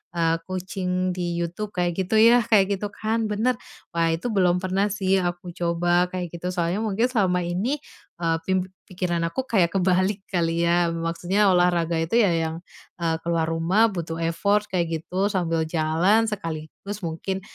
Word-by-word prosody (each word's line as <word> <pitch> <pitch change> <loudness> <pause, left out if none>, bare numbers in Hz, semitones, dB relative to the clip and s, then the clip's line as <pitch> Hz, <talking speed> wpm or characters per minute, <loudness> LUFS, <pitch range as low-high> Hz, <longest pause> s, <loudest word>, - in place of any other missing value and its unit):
eee, 165 -1 +2
kucing 185 0 -2
di 175 -1 -2
YouTube, 175 +5 -4
kayak 175 -1 +1
gitu 205 - -1
ya 230 +2 +7
kayak 200 -2 +4
gitu 205 +2 -3
kan, 220 +2 -1
bener. 230 +5 +1 0.4
Wah, 165 -1 +2
itu 170 +9 -5
belum 180 -3 +3
pernah 190 +2 +1
sih 195 -1 +1
aku 175 0 -3
coba 175 0 +1
kayak 180 -2 -4
gitu, 180 +2 -4
soalnya 175 +3 0
mungkin 215 +1 0
selama 185 -6 +1
ini, 185 +11 -1 0.4
eee, 165 -1 +1
pim 185 -1 +2 0.2
pikiran 175 -2 -2
aku 215 +11 -3
kayak 180 -6 +2
kebalik 185 +2 +2
kali 170 -2 +1
ya. 175 0 +3
Maksudnya 175 +5 +1
olahraga 175 -2 +2
itu 165 +7 -1
ya 205 -6 +4
yang, 165 0 -2 0.4
eee, 165 -1 +1
ke - - -10
luar 165 -1 +1
rumah, 180 +8 +3
butuh 165 -3 -4
effort 200 +5 +1
kayak 175 -3 +1 0.2
gitu, 190 +3 0
sambil 165 -5 0
jalan 165 +7 +2
sekaligus 190 +2 -6
mungkin 175 +4 -3
180 Hz, 170 wpm, -24 LUFS, 170-195 Hz, 0.4 s, ya